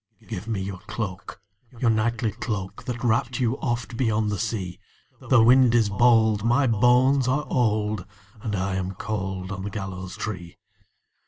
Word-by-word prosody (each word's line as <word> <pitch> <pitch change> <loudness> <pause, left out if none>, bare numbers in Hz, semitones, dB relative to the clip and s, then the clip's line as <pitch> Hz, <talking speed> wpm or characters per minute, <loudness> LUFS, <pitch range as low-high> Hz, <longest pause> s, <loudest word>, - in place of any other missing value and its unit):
"Give 95 +5 -6
me 105 -4 -2
your 95 -1 -5
cloak, 100 -3 -5 0.4
your 115 -1 +2
knightly 115 0 0
cloak, 110 0 -5
That 125 -2 -4
wrapped 120 +2 +1
you 125 +1 0
oft 120 -2 -3
beyond 110 -4 +1
the 100 - -2
sea; 100 -5 -3 0.5
The 120 -4 +6
wind 125 0 +6
is 110 -3 +3
bold, 110 0 +4
my 130 +5 +3
bones 125 +3 +4
are 135 +3 +1
old, 105 -5 0 0.3
And 105 -2 -2
I 95 0 -1
am 95 0 -3
cold 95 -2 -4
on 95 -1 -5
the 100 - -3
gallows 95 -3 -6
tree." 90 -5 -6
110 Hz, 160 wpm, -25 LUFS, 95-120 Hz, 0.5 s, The